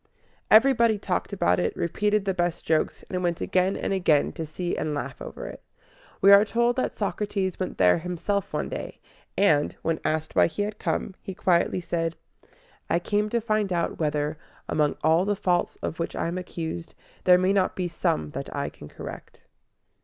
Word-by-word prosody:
Everybody 230 -1 +5
talked 195 -1 -2
about 90 - +2
it, 90 - -1
repeated 205 +4 0
the 195 - +1
best 175 -2 -1
jokes, 155 -1 0
and 180 -1 -1
went 175 -2 0
again 185 +1 +1
and - - -2
again 165 -6 +3
to 160 - -6
see 175 +3 -3
and 150 -1 -2
laugh 145 - -5
over - - -7
it. - - -8 0.6
We 195 - +7
are 200 +1 +9
told 235 +2 +1
that 255 - -1
Socrates 200 -2 -2
went 185 - -3
there 90 - +5
himself 180 +4 -2
one - - -2
day; - - -6 0.4
and, 155 -8 +3
when 165 -1 0
asked 155 0 -1
why - - +6
he 170 +5 -2
had 210 +1 -5
come, 195 - -2
he 190 - -7
quietly 180 0 +2
said, 165 -1 -2 0.7
"I - - +3
came 210 +4 0
to 235 - +1
find 215 -3 0
out 170 -1 -1
whether, 150 -1 -1 0.3
among 150 -1 +1
all 160 +3 +4
the 205 +1 0
faults 180 -2 0
of 160 - -3
which 165 - -3
I - - -1
am 180 +2 -3
accused, 170 -2 -6 0.3
there 180 -1 +7
may 185 +2 +2
not 190 -2 +1
be 180 -1 -1
some 80 - -1
that - - -5
I - - -2
can 75 - -13
correct." - - -10
180 Hz, 190 wpm, -26 LUFS, 160-200 Hz, 0.7 s, are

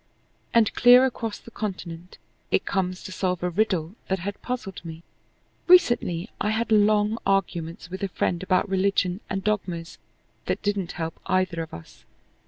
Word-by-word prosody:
And 230 -3 +4
clear 245 +1 +7
across 230 -4 -3
the 230 - -14
continent 180 -5 -6 0.3
it - - +1
comes 185 -1 -1
to - - -7
solve 180 -2 -1
a 180 - 0
riddle 185 -3 0
that 190 - 0
had 200 +3 -5
puzzled 230 -8 -5
me. 165 0 -9 0.6
Recently 240 - +4
I 210 - +1
had 225 +1 -1
long 210 +1 +3
arguments 175 -3 -1
with 190 - -6
a 200 - 0
friend 175 -1 -1
about 185 +1 +1
religion 190 -1 +1
and 190 0 -2
dogmas 180 -5 -2 0.5
that - - -1
didn't 200 -4 -1
help 165 -1 -5
either 185 -2 +1
of 160 - -7
us. 80 - -12
190 Hz, 160 wpm, -25 LUFS, 175-210 Hz, 0.6 s, clear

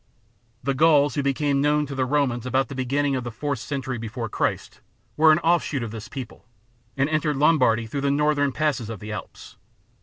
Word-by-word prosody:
The 140 +2 0
Gauls 145 0 +4
who 145 - 0
became 140 0 0
known 150 +1 +2
to 140 - -7
the 130 -1 -1
Romans 130 -4 0
about 130 +1 +1
the - - -6
beginning 135 +2 0
of 130 - -2
the 120 - -4
fourth 140 +3 -3
century 130 -2 -4
before 115 +1 -5
Christ - - -2 0.3
were 160 +1 +6
an 155 - +5
offshoot 165 -6 +1
of 115 - -5
this 110 +1 -8
people, 130 -4 -9 0.5
and 135 +1 +2
entered 155 -1 0
Lombardy 130 -7 +3
through 140 +5 -4
the 140 - +1
northern 145 0 +2
passes 130 -6 -1
of 110 -3 -6
the 105 +2 -7
Alps. 105 - -9
140 Hz, 195 wpm, -24 LUFS, 125-150 Hz, 0.5 s, were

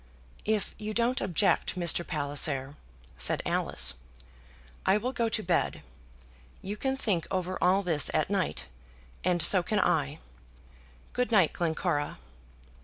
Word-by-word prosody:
"If 215 -1 -1
you 215 0 -5
don't 240 +2 +1
object, 190 +1 +1
Mr. 175 -1 +2
Palliser," 145 -2 0 0.4
said - - +3
Alice, - - +3 0.9
"I 200 - +3
will 250 +5 -3
go 235 -2 0
to 215 0 -2
bed. 175 -1 0 0.8
You 200 +2 -4
can 265 +5 -2
think 195 -10 -1
over 185 0 -2
all 190 +2 +3
this 160 -5 +1
at 155 +5 0
night, 195 -3 -1 0.6
and 175 -2 +1
so 185 +2 +6
can 210 +4 -1
I. 70 - +1 1.0
Good 250 0 -1
night, 190 -8 +4
Glencora." 160 -3 -1
185 Hz, 130 wpm, -28 LUFS, 165-215 Hz, 1.0 s, so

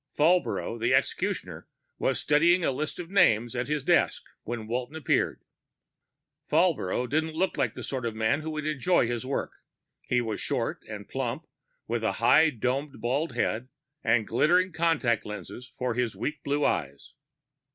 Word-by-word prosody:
Falbrough, 145 - +2
the 115 - +3
executioner, - - -2 0.3
was - - +1
studying 170 +4 +3
a - - +2
list 150 +4 -3
of 175 0 -7
names 120 - +3
at 125 0 -2
his 150 -2 -1
desk - - +2 0.2
when 115 -1 -5
Walton 125 +6 -3
appeared. 160 -4 0 1.1
Falbrough 140 - +2
didn't 155 +3 -1
look 190 +4 0
like - - 0
the - - -7
sort 130 -3 -3
of 110 - -4
man 110 +7 +1
who 160 - -5
would 155 -1 -4
enjoy 155 +1 +2
his 120 +1 -3
work. 140 - -2 0.5
He 125 - +2
was 110 -3 -3
short - - -2
and - - -7
plump, - - -3 0.4
with 115 0 -2
a 110 - +1
high 120 +9 +5
domed 135 +2 -2
bald 130 +6 -1
head 120 +1 -1 0.3
and 115 -2 +3
glittering 180 - +3
contact 160 -9 +1
lenses 105 +5 -8
in 125 -1 0
his 120 -1 -1
weak 150 -2 -4
blue 145 +1 0
eyes. 70 -1 -2
130 Hz, 160 wpm, -27 LUFS, 115-155 Hz, 1.1 s, high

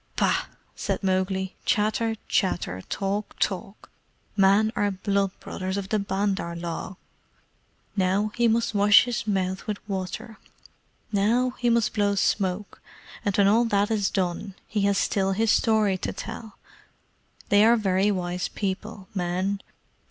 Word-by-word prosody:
"Bah!" - - +2 0.3
said - - -3
Mowgli. 190 0 0
"Chatter 220 +2 +1
chatter! 170 - 0
Talk, 200 +1 -2
talk! 195 +1 -3 0.4
Men 200 +2 +4
are 205 - +1
blood 200 0 0
brothers 190 +1 -4
of 195 -1 -4
the 215 - +1
Bandar 195 -3 -1
log. 170 +2 -5 1.0
Now 195 +2 +1
he 240 -1 +3
must 230 0 +1
wash 205 0 +7
his 240 -3 -3
mouth 190 -1 -1
with 210 -1 -2
water; 200 +4 -5 0.7
now 230 +5 +2
he 245 - +2
must 230 -2 +2
blow 205 -1 +1
smoke; 195 0 -1 0.4
and 205 -3 0
when 200 -1 +5
all 225 +4 +4
that 205 -1 +1
is 205 -3 +1
done 185 +1 -2
he 210 - -2
has 200 - +1
still 195 -1 +1
his 220 +2 +2
story 215 -5 +2
to - - -3
tell. 220 -3 -8 0.9
They 205 +1 +6
are 235 +2 +6
very 195 -1 +2
wise 180 -2 -1
people 200 0 -4
men. 185 +2 -1
200 Hz, 140 wpm, -25 LUFS, 190-215 Hz, 1.0 s, wash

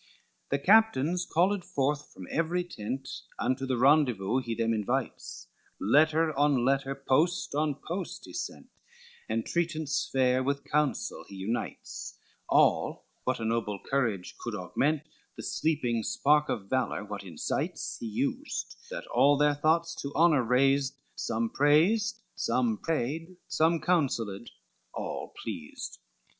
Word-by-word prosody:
XIX - - -31
The 140 - +1
captains 180 -5 +4
called 185 +3 +2
forthwith 145 0 -1
from 90 - -10
every 170 +2 0
tent, 135 -4 -5 0.3
Unto 130 +2 -1
the 130 -1 0
rendezvous 125 -5 +3
he 120 -3 -3
them 115 0 +1
invites; 110 - -3 0.3
Letter 155 +7 +3
on 140 -3 +3
letter, 135 0 +1
post 150 +6 +1
on 150 0 +1
post 180 +1 -4
he - - -12
sent, - - -6 0.6
Entreatance 155 +7 -1
fair 130 -1 +3
with 140 +2 -1
counsel 150 -2 -1
he 100 - -10
unites, 100 +5 -4 0.3
All, - - +3 0.2
what 130 -1 0
a 115 - -3
noble 110 -3 -1
courage 115 -9 0
could 120 -3 -4
augment, 145 +10 0 0.3
The - - -6
sleeping 125 -7 0
spark 150 +6 +2
of 100 -4 -2
valor 125 -4 -1
what 100 -1 -6
incites, 85 -5 -3
He 115 - -4
used, 110 - -3
that - - -5
all 145 +1 +4
their 150 0 +4
thoughts 160 +3 +2
to 140 - -4
honor 160 -4 +5
raised, 135 +3 +2 0.2
Some 115 +1 -1
praised, 170 +11 +3 0.2
some 120 -4 +1
paid, 165 +3 -2
some 165 +1 +2
counselled, 120 - 0 0.5
all - - -4
pleased. 90 -9 -6
135 Hz, 135 wpm, -29 LUFS, 115-155 Hz, 0.6 s, honor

